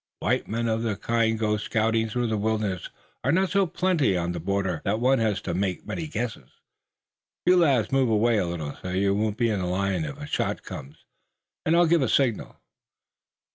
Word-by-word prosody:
White - - 0
men 115 +2 -1
of 110 0 0
the 110 -3 -1
kind 115 +1 +1
to - - -10
go 105 -1 +1
scouting 110 +1 0
through 120 +2 -1
the 110 -1 0
wilderness 105 -3 -1 0.3
are - - +2
not 190 +1 +2
so 195 -1 +3
plenty 170 - +1
on 85 0 -1
the 85 - -4
border 95 -1 -1
that 105 +3 0
one 130 +2 +3
has 110 -3 +1
to - - -3
make 95 0 -2
many 165 - -4
guesses. 115 - -4 1.0
You 180 - +6
lads 140 -10 +3
move 135 -2 +3
away 110 +1 +3
a 90 - 0
little 80 -4 -4
so 90 - -5
you 100 +2 +1
won't 105 +1 -1
be 120 -2 +2
in 100 -3 -1
line 90 0 0
if 70 - -6
a - - -6
shot - - -2
comes, 70 +3 -10 0.6
and 160 - +4
I'll 175 0 +5
give 170 -1 +3
a 130 - +1
signal." 125 -6 +1
110 Hz, 205 wpm, -26 LUFS, 95-125 Hz, 1.0 s, You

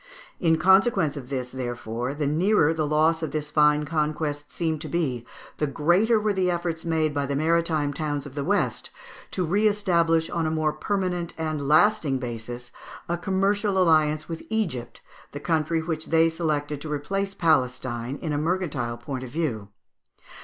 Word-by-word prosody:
In 165 -3 +3
consequence 190 - +4
of 130 -3 -8
this, 130 -2 -3
therefore, 120 0 -4
the 150 0 -1
nearer 160 +2 +3
the 155 -2 -1
loss 155 +2 +2
of 160 - -2
this 150 -1 -4
fine 150 0 +4
conquest 150 -1 -2
seemed 160 -3 -2
to 160 - -5
be, 135 -9 -2 0.3
the 150 - 0
greater 175 - +3
were 210 -1 0
the 185 -2 +1
efforts 170 -2 -2
made 160 -2 0
by 140 -1 -1
the 140 - -1
maritime 160 -1 +1
towns 145 -2 -3
of 140 - -9
the 145 0 -3
West 200 +6 0 0.4
to 185 - -1
re 200 +6 +3
establish, 170 -6 +2
on 165 -2 -1
a - - +1
more 155 -1 0
solid 180 -4 -1
and 155 -3 -2
lasting 155 -3 +4
basis, 120 0 -6 0.4
a 170 - 0
commercial 195 +2 0
alliance 155 -4 +3
with 165 -1 -5
Egypt, 175 - -3 0.3
the 145 - -5
country 160 +1 0
which 160 -1 -4
they 165 0 +4
selected 150 -3 -2
to 155 - -6
replace 195 +7 -2
Palestine, 130 -4 0
in 155 -3 -1
a 145 - 0
mercantile 150 -8 -1
point 130 +2 -5
of 130 - -7
view. 125 -9 -2
155 Hz, 170 wpm, -25 LUFS, 145-170 Hz, 0.4 s, consequence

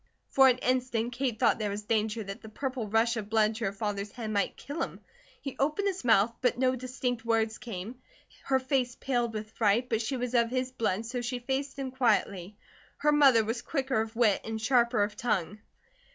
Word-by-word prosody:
For 270 -1 +7
an 250 -1 +4
instant 250 -2 0
Kate 250 -3 -1
thought - - +3
there 210 -1 -1
was 205 +1 -4
danger 220 +1 0
that 195 0 -7
the 220 - -10
purple 255 0 -3
rush 225 +3 +2
of 210 -2 -5
blood 220 -1 +3
to 230 - -2
her 195 - 0
father's 200 0 -3
head 225 -3 -5
might 200 -2 0
kill 290 +4 -6
him. - - -4 0.4
He 275 - -6
opened 305 +9 +1
his 380 -5 -2
mouth, 225 -1 +4
but 250 -2 +2
no 255 0 +2
distinct 250 -2 -3
words 225 -1 0
came. 235 +1 -7 0.4
Her 265 - +3
face 260 -1 0
paled 240 -3 -1
with 215 0 -6
fright, 225 +3 +1
but 225 -1 +1
she 260 +4 -2
was 250 0 -3
of 235 -1 +3
his 255 +1 -1
blood, 220 -4 -1
so 245 +2 -3
she 245 +1 -2
faced 270 +3 -3
him 270 -1 -4
quietly. 210 -6 0 0.4
Her 300 +1 +2
mother 275 -6 +6
was 230 +2 -2
quicker 265 -6 -1
of 225 +1 -5
wit, 225 -4 +3
and 220 0 -4
sharper 235 -2 +3
of 205 +1 -3
tongue. 210 -4 -1
235 Hz, 210 wpm, -29 LUFS, 215-255 Hz, 0.4 s, For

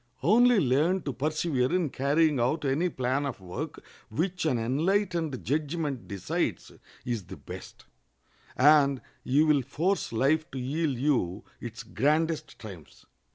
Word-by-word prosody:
Only 235 - +5
learn 155 +6 +2
to 140 - -3
persevere 145 -2 0
in 175 -6 +1
carrying 145 +1 +2
out 145 +6 0
any 150 +7 +1
plan 130 -1 -1
of 130 - -5
work 90 -1 -6 0.3
which 175 - -1
an 130 - +2
enlightened 160 - 0
judgment 150 -2 -2
decides 100 -3 -2 0.3
is 115 -6 -3
the - - -9
best, - - -10 0.7
and 140 -1 +5 0.2
you 145 +5 +3
will 150 -3 +4
force 165 +10 -1
life 145 +7 +1
to 135 - -7
yield 140 +2 -1
you 120 -8 0 0.2
its 115 -2 -7
grandest 150 - 0
triumphs. 95 - -12
145 Hz, 135 wpm, -28 LUFS, 125-160 Hz, 0.7 s, Only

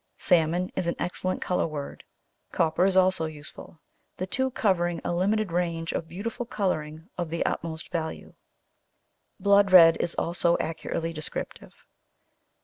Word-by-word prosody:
Salmon 175 +1 +2
is 175 - -1
an 170 - 0
excellent 185 +1 -2
colour 180 - 0
word, 145 -3 -7 0.5
copper 165 +2 +2
is 190 -1 +2
also 185 -3 +3
useful, 155 +1 -11 0.4
the 185 - -2
two 260 +7 0
covering 175 -8 0
a - - -1
limited 200 +2 +1
range 165 -2 -1
of 165 - -3
beautiful 230 +8 -5
colouring 165 -8 -3
of 175 -2 -2
the 165 +1 -2
utmost 160 0 -4
value. 160 -2 -4 1.1
Blood 200 -1 +4
red 165 -3 +8
is 170 - -1
also 170 0 +1
accurately 165 +1 -3
descriptive. 155 -1 -7
175 Hz, 140 wpm, -26 LUFS, 165-185 Hz, 1.1 s, red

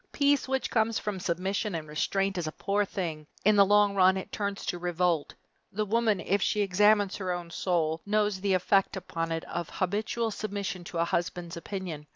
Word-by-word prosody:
Peace 285 -1 +2
which 265 0 -1
comes 225 -1 +2
from 210 -3 -3
submission 190 +3 -1
and 155 -2 -5
restraint 195 +6 0
is 165 - -3
a - - -2
poor 200 +5 0
thing. 160 -6 -4 0.2
In 215 +1 +6
the 200 - +7
long 205 0 +4
run 190 -1 +5
it 190 - -6
turns 200 -1 -3
to 175 - -2
revolt. 175 -3 0 0.4
The 215 +2 -1
woman, 220 -1 +2
if 200 +2 0
she 210 - +1
examines 205 +1 +3
her 185 -2 -2
own 175 -1 -4
soul, 165 -3 0
knows 210 -2 0
the 195 -1 +2
effect 195 +2 +2
upon 165 -3 -4
it 165 0 -2
of 170 -2 -4
habitual 215 +4 -1
submission 200 -3 -4
to 175 - -6
a 165 - +2
husband's 175 0 -2
opinion. 170 -4 -6
190 Hz, 195 wpm, -28 LUFS, 175-205 Hz, 0.4 s, the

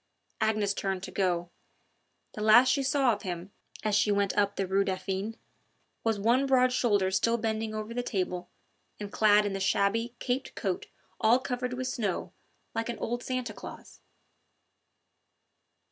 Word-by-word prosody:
Agnes 215 -2 +2
turned 195 -2 -2
to - - -6
go. 175 -2 0 0.8
The 215 - -6
last 230 +4 +7
she 275 +1 +2
saw 270 -2 +3
of 210 - -6
him, 180 0 -5 0.3
as 215 -1 0
she 210 +1 +3
went 200 -1 +1
up 200 -1 +2
the 195 - -1
Rue 195 +2 +2
Dauphine, 195 +3 -3 0.7
was 225 -2 +1
one 240 +7 +2
broad 255 -1 +4
shoulder 205 -7 +2
still 230 +5 +2
bending 220 -1 -2
over 215 +1 -4
the 245 - -1
table, 180 -6 -3 0.5
and 205 -1 -6
clad 210 -1 +5
in 205 - -1
the 195 - -2
shabby, 215 +4 +1
caped 255 +1 -3
coat 190 -3 -2 0.3
all 225 +3 +5
covered 250 -1 -3
with 255 +1 -3
snow 220 -7 -2 0.4
like 225 +1 -2
an 235 - -3
old 240 +1 -3
Santa 255 -4 -3
Claus. - - -11
215 Hz, 160 wpm, -29 LUFS, 195-240 Hz, 0.8 s, last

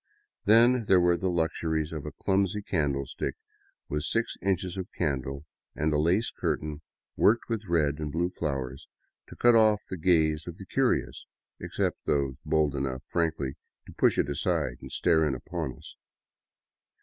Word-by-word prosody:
Then 115 +3 +5
there 95 -2 +5
were 90 0 +4
the 95 +2 -1
luxuries 80 -2 -1
of 75 -3 -5
a - - -4
clumsy 100 +1 0
candlestick 70 -7 -2 0.5
with 75 - -2
six 115 +9 -1
inches 95 -2 -1
of 95 0 -5
candle, 70 -2 -2 0.3
and 75 +1 0
a 75 - +2
lace 90 +9 +2
curtain 75 0 -3 0.3
worked 115 +3 +3
with 110 -3 -3
red 75 -3 +1
and 75 -1 -3
blue 85 +3 0
flowers 70 -5 -4 0.4
to - - -11
cut 120 0 +5
off 110 -2 +4
the 95 - -3
gaze 80 -2 +2
of 85 0 -7
the 95 - -9
curious, 70 - 0 0.3
except - - -2
those 70 -2 +1
bold 75 -2 +2
enough 65 -2 -3
frankly 80 -5 -1 0.3
to - - -12
push - - +3
it - - +2
aside 70 -1 -1
and - - -9
stare 80 -1 +3
in 75 -4 +1
upon 65 +1 -5
us. - - -13
80 Hz, 160 wpm, -28 LUFS, 70-95 Hz, 0.5 s, Then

